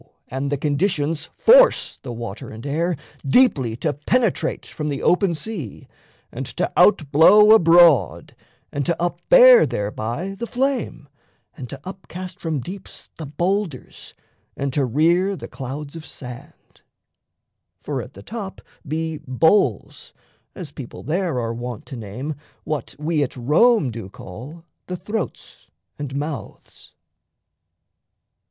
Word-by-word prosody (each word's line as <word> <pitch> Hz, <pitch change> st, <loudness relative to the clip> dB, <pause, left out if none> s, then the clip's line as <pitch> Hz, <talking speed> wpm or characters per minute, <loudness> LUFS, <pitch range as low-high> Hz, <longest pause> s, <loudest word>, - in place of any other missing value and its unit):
And 135 Hz, +2 st, -3 dB
the 145 Hz, -, 0 dB
conditions 150 Hz, +1 st, -1 dB
force -, -, +5 dB
[the 130 Hz, -, -7 dB
water 115 Hz, -3 st, -7 dB
and 110 Hz, +3 st, -10 dB
air] 165 Hz, +5 st, 0 dB, 0.3 s
Deeply 135 Hz, -, +3 dB
to 145 Hz, +5 st, -1 dB
penetrate 180 Hz, -, 0 dB
from 150 Hz, -1 st, -5 dB
the 140 Hz, -2 st, -4 dB
open 180 Hz, -1 st, +3 dB
sea, 155 Hz, -, -7 dB, 0.4 s
And -, -, -5 dB
to -, -, -1 dB
out 155 Hz, -9 st, +4 dB
blow 210 Hz, +8 st, +7 dB
abroad, 165 Hz, -, +5 dB, 0.4 s
and 145 Hz, -, -2 dB
to 170 Hz, -1 st, 0 dB
up 175 Hz, 0 st, -2 dB
bear -, -, +8 dB
Thereby 110 Hz, -, -3 dB
the 235 Hz, -, -3 dB
flame, 255 Hz, -, -2 dB, 0.5 s
and 125 Hz, -3 st, -8 dB
to 140 Hz, -, -7 dB
up 190 Hz, 0 st, -9 dB
cast 185 Hz, 0 st, -8 dB
from 160 Hz, -5 st, -2 dB
deeps 185 Hz, +7 st, -10 dB
The 155 Hz, -, -6 dB
boulders, 175 Hz, 0 st, -3 dB, 0.4 s
and 140 Hz, -1 st, -2 dB
to 140 Hz, -1 st, +1 dB
rear 170 Hz, -, +2 dB
the -, -, -8 dB
clouds 140 Hz, +3 st, -7 dB
of 165 Hz, -, -8 dB
sand. 135 Hz, +3 st, -12 dB, 1.0 s
For -, -, -3 dB
at -, -, -12 dB
the -, -, -12 dB
top 210 Hz, -4 st, -7 dB, 0.3 s
be 160 Hz, +1 st, -3 dB
"bowls," 160 Hz, +10 st, +1 dB, 0.4 s
as 170 Hz, -7 st, -8 dB
people 135 Hz, -4 st, -9 dB
there 165 Hz, -1 st, -1 dB
Are 115 Hz, -1 st, -2 dB
wont 120 Hz, -1 st, -6 dB
to -, -, -8 dB
name 120 Hz, +7 st, -5 dB, 0.3 s
what 150 Hz, -5 st, -4 dB
we 155 Hz, +1 st, -1 dB
at 135 Hz, -2 st, -2 dB
Rome 150 Hz, -, +3 dB
do 110 Hz, -4 st, -7 dB
call 125 Hz, -, -10 dB, 0.2 s
The 180 Hz, -, -4 dB
throats 205 Hz, +2 st, -6 dB, 0.3 s
and 140 Hz, -2 st, -5 dB
mouths. 145 Hz, +1 st, -7 dB
155 Hz, 135 wpm, -22 LUFS, 135-185 Hz, 1.0 s, bear